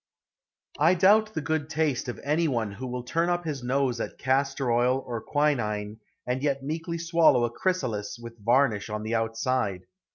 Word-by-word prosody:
I 165 +5 +5
doubt 215 +4 +4
the 160 - -1
good 155 -1 -2
taste 155 -5 0
of 125 - -5
any 155 +4 +1
one 115 -7 -1
who 120 +6 -7
will 125 0 -4
turn 165 +7 0
up 175 0 -1
his 145 -4 -3
nose 125 -1 0
at - - -5
castor 135 -1 0
oil 125 +3 +2
or 120 -2 -4
quinine 110 -7 -1 0.3
and 125 +1 -1
yet 140 -2 0
meekly 165 +4 -3
swallow 165 -6 +4
a 120 - -3
chrysalis 120 - -2
with 115 -2 -11
varnish 120 -3 +2
on 105 0 -4
the 110 +1 -3
outside. 115 -3 -1
130 Hz, 175 wpm, -27 LUFS, 115-155 Hz, 0.3 s, I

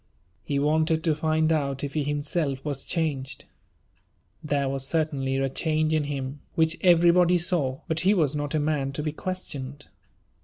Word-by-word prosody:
He 140 +8 -2
wanted 160 +2 +2
to 160 - +3
find 155 +1 +1
out 140 -3 -1
if 140 - -3
he 150 - 0
himself 145 -1 -2
was 140 -3 -3
changed. 140 -5 -2 1.0
There 145 -2 0
was 135 0 -2
certainly 140 -5 0
a 135 0 +1
change 155 +3 0
in 155 -2 +1
him, 140 -1 -4 0.2
which 160 0 +2
everybody 175 0 +5
saw; 160 -6 -1
but 160 0 0
he 195 +4 +3
was 150 -6 +2
not 145 0 -2
a - - +2
man 145 -2 -1
to 150 - -3
be 155 - -1
questioned. 145 -5 -5
150 Hz, 165 wpm, -26 LUFS, 140-160 Hz, 1.0 s, everybody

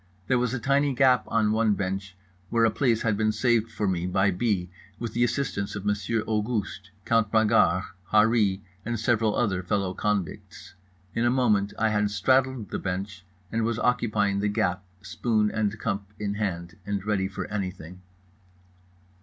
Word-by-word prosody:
There 125 -2 +2
was 125 -1 0
a 130 - -1
tiny 140 +2 +1
gap 130 -1 +4
on 110 -2 +2
one 110 -1 +2
bench 95 0 -4 0.3
where 115 -1 +3
a 110 - +3
place 115 -2 +1
had 110 -2 +1
been 110 +1 +1
saved 115 0 +1
for 105 - -2
me 90 -1 -1
by 95 +2 +2
B., 90 -2 -1 0.3
with 115 -1 -5
the 120 - +2
assistance 120 -6 -1
of 105 -1 -6
Monsieur 105 +2 0
Auguste, 105 -3 -2 0.2
Count 115 -2 +2
Bragard, 105 -5 +4 0.3
Harree 105 -3 +3 0.2
and 120 0 -3
several 115 -1 +1
other 95 -6 0
fellow 95 0 -1
convicts. 100 -4 -3 0.4
In 115 - 0
a 120 - +4
moment 110 -6 +2
I 110 0 +2
had 105 -1 +1
straddled 130 +3 +1
the - - -2
bench 95 0 -4 0.3
and 115 - 0
was 115 0 0
occupying 105 -5 +1
the 105 - 0
gap, 100 -3 0 0.2
spoon 105 +1 0
and 110 -1 -1
cup 100 -1 -3
in 105 -1 -2
hand, 95 -3 -3
and 100 0 -3
ready 100 -3 0
for 95 - -5
anything. 90 -3 -5
105 Hz, 170 wpm, -26 LUFS, 100-115 Hz, 0.4 s, gap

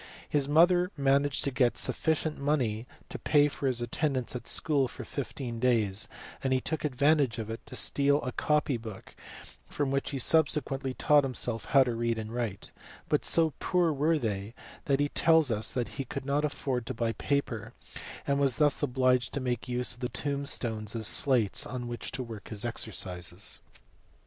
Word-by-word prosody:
His 145 -2 0
mother 175 +4 +5
managed 140 0 +2
to 140 - 0
get 125 -2 +2
sufficient 160 -1 -1
money 125 -6 0 0.2
to - - -6
pay 145 -1 +4
for 140 - -3
his 120 -2 0
attendance 130 +1 -1
at 125 - -6
school 145 -4 +1
for - - -8
fifteen 130 -4 -5
days, 110 -5 +1 0.4
and 135 - 0
he 130 - +3
took 160 +4 -3
advantage 140 -2 +2
of 110 -1 -4
it 115 - -6
to - - -8
steal 140 +2 +2
a 125 - -2
copy 150 -1 +1
book 110 -4 -10 0.5
from 145 -2 -2
which 135 0 0
he 140 - -3
sub 160 +4 +5
sequently 135 -2 -3
taught 145 -1 +5
himself 120 -3 -2
how 135 -1 +5
to 125 -2 -2
read 115 0 -1
and 110 0 -5
write; 115 -5 -4 0.4
but - - +2
so 160 -3 +2
poor 175 -3 +2
were 155 +3 +2
they 105 -3 -3 0.3
that 140 -1 +2
he 145 0 +1
tells 160 -4 +4
us 110 0 0
he 135 - -4
could 130 - -6
not 140 +2 +1
afford 135 -5 -2
to 130 - -3
buy 115 0 0
paper, 115 -4 -2 0.5
and 140 0 +1
was 135 -4 +2 0.2
obliged 125 -3 +2
to - - 0
make 125 -1 -2
use 125 0 -1
of 120 - -15
the 125 -1 -2
tombstones 120 -7 -2
as 110 -1 0
slates 120 -4 +2
on 125 -1 -5
which 120 -1 -5
to 130 0 -4
work 115 -4 -9
his 110 +1 -2
exercises. 95 -5 -4
130 Hz, 180 wpm, -29 LUFS, 115-145 Hz, 0.5 s, mother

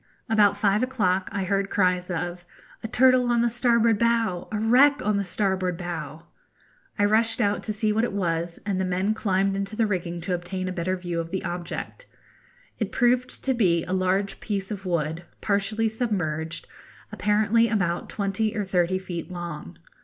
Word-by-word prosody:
About 210 -4 +4
five 205 +1 +2
o'clock 195 -8 0
I 200 -1 -2
heard 195 +1 0
cries 180 -2 +1
of 175 0 -3 0.4
'A - - -4
turtle 255 +1 +4
on 240 -1 +3
the 240 - +2
starboard 235 -2 +3
bow,' 230 -6 +1
'A 215 - -1
wreck 265 +6 +5
on 210 -1 +2
the 200 - 0
starboard 185 -2 -1
bow.' 165 -2 -6 0.7
I 205 - +3
rushed 225 +2 +2
out 205 -3 +1
to 215 - -3
see 215 0 0
what 220 +2 +1
it 240 - 0
was, 170 -3 -2
and 195 -2 -1
the - - +1
men 185 +3 0
climbed 195 -2 0
into 200 +2 -3
the 225 - +2
rigging 175 -4 -2
to 180 +2 -2
obtain 185 +1 -3
a - - -2
better 185 +2 -1
view 175 -2 -3
of 165 0 -4
the 190 +2 -3
object. 175 - -5 0.7
It - - -2
proved 250 0 +1
to 265 - +1
be 175 -9 +2
a 180 - -4
large 190 +1 0
piece 200 -2 -3
of 195 -2 -5
wood, 165 -1 -1 0.2
partially 210 +2 0
submerged, 175 -9 -2 0.5
apparently 215 +2 +2
about 190 -5 -1
twenty 215 +2 -1
or 205 - -1
thirty 185 -1 +1
feet 180 -3 -6
long. 160 - -7
195 Hz, 180 wpm, -25 LUFS, 180-220 Hz, 0.7 s, wreck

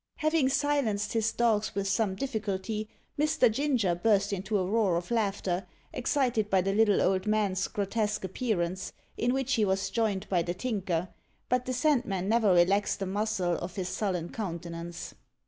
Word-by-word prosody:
Having 310 -3 +2
silenced 275 -8 0
his 225 -1 +1
dogs 220 -4 +1
with 200 -1 -1
some 195 0 +1
difficulty, 215 -3 -3 0.3
Mr. 300 -5 +3
Ginger 250 -7 +1
burst 200 +2 +2
into 200 +2 -1
a 185 - 0
roar 200 -2 +2
of 175 +4 -5
laughter, 195 -5 -1 0.3
excited 245 -5 0
by 195 - +4
the 195 +2 0
little 210 -1 +4
old 190 +2 +1
man's 205 -3 +1
grotesque 210 +1 -1
appearance, 190 -3 -2 0.2
in 240 +2 +1
which 265 0 0
he 225 - +2
was 190 -1 0
joined 215 -4 0
by 180 -3 +2
the 175 +1 -3
Tinker; 185 -5 -2 0.4
but 250 0 +1
the 255 - -2
Sandman 245 - +1
never 220 -2 +3
relaxed 190 +5 +3
a - - -1
muscle 195 -2 0
of 175 +1 -6
his 185 -2 -3
sullen 180 -3 -2
countenance. 170 -3 -6
205 Hz, 165 wpm, -29 LUFS, 190-230 Hz, 0.4 s, by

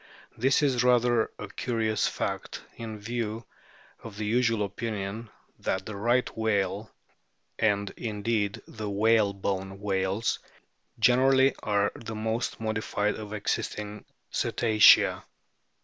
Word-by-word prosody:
This 135 +5 +2
is 130 -4 +2
rather 120 -2 +3
a 105 - -6
curious 110 0 -1
fact - - -4
in 110 -2 -6
view 115 +1 -4 0.6
of 110 -3 -9
the 105 - -3
usual 115 -1 +2
opinion 105 +1 -5 0.3
that 95 0 -2
the 105 - -6
Right 120 +5 +2
whale, 105 -1 0 0.7
and 100 -2 +1
indeed 105 -2 -2
the 110 -1 -6
whalebone 100 -2 +1
whales 100 +2 -1 0.6
generally, 130 +2 +4
are 105 -1 +1
the 110 -1 -7
most 110 +2 -2
modified 110 -1 -1
of 105 -1 -8
existing 105 0 -3 0.3
Cetacea. 110 -3 +5
110 Hz, 110 wpm, -28 LUFS, 100-115 Hz, 0.7 s, Cetacea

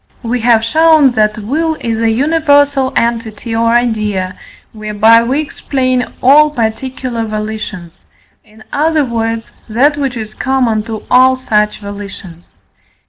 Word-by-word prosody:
We 245 +1 -2
have 225 -1 +3
shown 315 +1 +4
that 215 -2 +1
will 310 +10 -1
is 225 -1 -3
a 225 0 +1
universal 285 0 +2
entity 230 -1 -2
or 230 +1 +1
idea, 215 -6 -1 0.4
whereby 215 +1 +3
we 255 +5 -1
explain 255 -4 -2
all 295 +4 +6
particular 245 -1 -3
volitions 215 -5 -6 0.4
in 220 0 -19
other 310 0 +1
words, 225 -1 -3 0.2
that 280 +7 +2
which 270 -4 -2
is 215 -1 -7
common 250 -3 0
to 220 -1 -5
all 255 +1 +5
such 210 -5 -1
volitions. 200 -4 -10
230 Hz, 130 wpm, -13 LUFS, 215-265 Hz, 0.4 s, all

